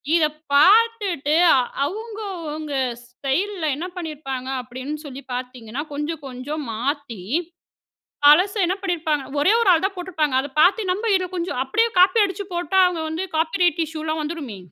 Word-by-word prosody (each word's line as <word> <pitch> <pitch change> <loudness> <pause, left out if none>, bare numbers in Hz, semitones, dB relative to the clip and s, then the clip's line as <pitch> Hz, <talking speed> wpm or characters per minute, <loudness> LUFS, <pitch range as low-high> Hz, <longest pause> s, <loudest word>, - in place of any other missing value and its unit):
இதை 315 -3 +3 0.3
பாத்துட்டு, 390 -4 +4 0.5
அவங்க 435 +4 -7 0.3
அவங்க 305 -1 -5 0.3
ஸ்டைல்ல 315 +9 -2
என்ன 340 +4 -4
பண்ணிருப்பாங்க 275 -6 -5
அப்படின்னு 260 +5 -6
சொல்லி 275 -1 -8
பாத்தீங்கன்னா, 250 +1 -6
கொஞ்சம், 295 +1 -4
கொஞ்சம் 270 +4 -5
மாத்தி 250 - -3 1.0
பழச 360 +8 +6
என்ன 365 +2 0
பண்ணியிருப்பாங்க, 325 -6 -1 0.2
ஒரே 295 +8 +4
ஒரு 460 -4 +3
ஆள் 330 -1 +3
தான் 390 - -1
போட்டிருப்பாங்க, 325 -6 -1
அதை 285 - -7
பாத்து 390 +8 +5
நம்ப 405 +5 -2
இதை 370 -1 +1
கொஞ்சம் 340 -7 -3
அப்படியே 445 - +2
காப்பி 370 +5 +6
அடிச்சு 395 +1 -4
போட்டா 350 +2 +1
அவங்க 350 -2 -3
வந்து 320 +4 -3
காப்பி 320 +3 0
ரைட் 345 -2 +2
இஷ்யூ 315 0 -7
எல்லாம் 315 0 -2
வந்துருமே. 300 -9 -5
315 Hz, 150 wpm, -22 LUFS, 280-365 Hz, 1.0 s, பழச